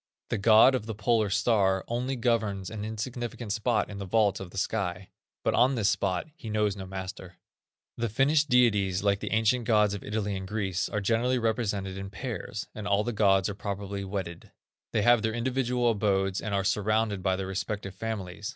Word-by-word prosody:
The -, -, -1 dB
god 110 Hz, +5 st, +7 dB
of 115 Hz, -4 st, -2 dB
the 110 Hz, -, -4 dB
Polar 110 Hz, 0 st, +1 dB
star 95 Hz, -3 st, +2 dB
only 125 Hz, +3 st, -2 dB
governs 110 Hz, -6 st, 0 dB
an 105 Hz, -2 st, -5 dB
insignificant 115 Hz, 0 st, -4 dB
spot 110 Hz, +1 st, +1 dB
in 100 Hz, -1 st, -8 dB
the 100 Hz, -, -4 dB
vault 105 Hz, 0 st, +2 dB
of 95 Hz, -, -7 dB
the 95 Hz, -, -11 dB
sky, 90 Hz, -1 st, -2 dB, 0.3 s
but -, -, +1 dB
on 130 Hz, +2 st, +4 dB
this 110 Hz, -3 st, +2 dB
spot 95 Hz, -3 st, 0 dB
he 115 Hz, -, -8 dB
knows 105 Hz, -2 st, +1 dB
no 95 Hz, -2 st, -7 dB
master." 95 Hz, -1 st, -7 dB, 0.6 s
The 115 Hz, 0 st, -1 dB
Finnish 145 Hz, +7 st, +3 dB
deities, 105 Hz, -8 st, +3 dB
like 100 Hz, -1 st, +2 dB
the -, -, -5 dB
ancient 115 Hz, +2 st, +2 dB
gods 105 Hz, -3 st, +3 dB
of 100 Hz, -, -6 dB
Italy 105 Hz, -1 st, -2 dB
and 95 Hz, 0 st, -5 dB
Greece, 95 Hz, -3 st, -2 dB
are 105 Hz, -, -2 dB
generally 120 Hz, +5 st, +1 dB
represented 105 Hz, -5 st, -1 dB
in 95 Hz, 0 st, -6 dB
pairs, 110 Hz, -1 st, -5 dB
and 105 Hz, -1 st, -6 dB
all 100 Hz, +1 st, +2 dB
the 120 Hz, -, -2 dB
gods 95 Hz, -3 st, +3 dB
are 105 Hz, -, -3 dB
probably 100 Hz, 0 st, -4 dB
wedded. 95 Hz, -3 st, -5 dB, 0.4 s
They 105 Hz, -, +1 dB
have 120 Hz, 0 st, +5 dB
their 110 Hz, +1 st, -1 dB
individual 125 Hz, 0 st, +1 dB
abodes 95 Hz, -3 st, 0 dB
and 110 Hz, -, -4 dB
are 100 Hz, -, +1 dB
surrounded 105 Hz, 0 st, +1 dB
by 95 Hz, 0 st, +1 dB
their 95 Hz, 0 st, -3 dB
respective 95 Hz, 0 st, -4 dB
families. 105 Hz, -1 st, -5 dB
105 Hz, 195 wpm, -28 LUFS, 95-115 Hz, 0.6 s, god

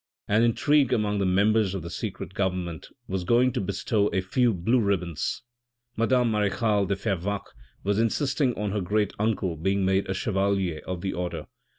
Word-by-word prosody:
An 105 Hz, +2 st, +3 dB
intrigue 135 Hz, +4 st, +3 dB
among 105 Hz, -2 st, +1 dB
the 100 Hz, -, +1 dB
members 100 Hz, +1 st, +2 dB
of 95 Hz, -, -4 dB
the 85 Hz, -, -7 dB
secret 95 Hz, -2 st, -5 dB
government 90 Hz, -4 st, -2 dB, 0.2 s
was 95 Hz, -1 st, -2 dB
going 120 Hz, +7 st, +3 dB
to -, -, -1 dB
bestow 100 Hz, +2 st, 0 dB
a 95 Hz, -, 0 dB
few 120 Hz, +6 st, +2 dB
blue 110 Hz, +7 st, +1 dB
ribbons; 90 Hz, -7 st, -1 dB, 0.5 s
madame 120 Hz, +1 st, +2 dB
marechale 105 Hz, -1 st, +1 dB
de 100 Hz, -, 0 dB
Fervaques 100 Hz, -1 st, -3 dB, 0.3 s
was 100 Hz, +1 st, +1 dB
insisting 130 Hz, +3 st, +1 dB
on 105 Hz, -1 st, -2 dB
her 105 Hz, 0 st, -1 dB
great 105 Hz, +2 st, 0 dB
uncle 100 Hz, -5 st, 0 dB
being 95 Hz, +4 st, 0 dB
made 95 Hz, +1 st, +1 dB
a 95 Hz, -, -1 dB
chevalier 95 Hz, -, 0 dB
of 90 Hz, -2 st, -4 dB
the 95 Hz, -, -2 dB
order. 85 Hz, -3 st, -4 dB
100 Hz, 175 wpm, -26 LUFS, 95-110 Hz, 0.5 s, An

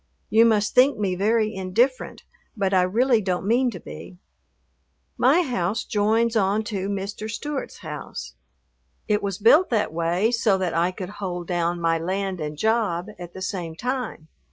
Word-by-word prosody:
You 225 Hz, +1 st, +6 dB
must 210 Hz, -2 st, +2 dB
think 260 Hz, +3 st, +5 dB
me 200 Hz, -3 st, 0 dB
very 215 Hz, +3 st, +1 dB
indifferent, 220 Hz, +8 st, 0 dB, 0.3 s
but 195 Hz, -1 st, 0 dB
I 185 Hz, -, +5 dB
really 230 Hz, +6 st, +2 dB
don't 185 Hz, -1 st, -2 dB
mean 245 Hz, +4 st, +3 dB
to -, -, -7 dB
be. 180 Hz, -, -10 dB, 1.0 s
My 355 Hz, -, +4 dB
house 225 Hz, -, -1 dB
joins 220 Hz, +3 st, +1 dB
on 205 Hz, +1 st, +2 dB
to 195 Hz, 0 st, -2 dB
Mr. 205 Hz, +2 st, -4 dB
Stewart's 285 Hz, +6 st, -5 dB
house. 150 Hz, -, -7 dB, 0.7 s
It 210 Hz, 0 st, +1 dB
was 195 Hz, -2 st, -3 dB
built 260 Hz, -, +5 dB
that 215 Hz, -8 st, 0 dB
way 170 Hz, +7 st, +1 dB
so 225 Hz, -4 st, +2 dB
that 185 Hz, -3 st, -2 dB
I 170 Hz, +2 st, +2 dB
could 185 Hz, 0 st, -7 dB
"hold 180 Hz, -2 st, -3 dB
down" 175 Hz, 0 st, -1 dB
my 165 Hz, -1 st, +1 dB
land 190 Hz, +1 st, -2 dB
and 150 Hz, 0 st, -4 dB
job 215 Hz, -3 st, 0 dB
at 175 Hz, -1 st, -9 dB
the 190 Hz, -, -6 dB
same 175 Hz, -4 st, -4 dB
time. 250 Hz, -8 st, -4 dB
200 Hz, 165 wpm, -24 LUFS, 180-225 Hz, 1.0 s, You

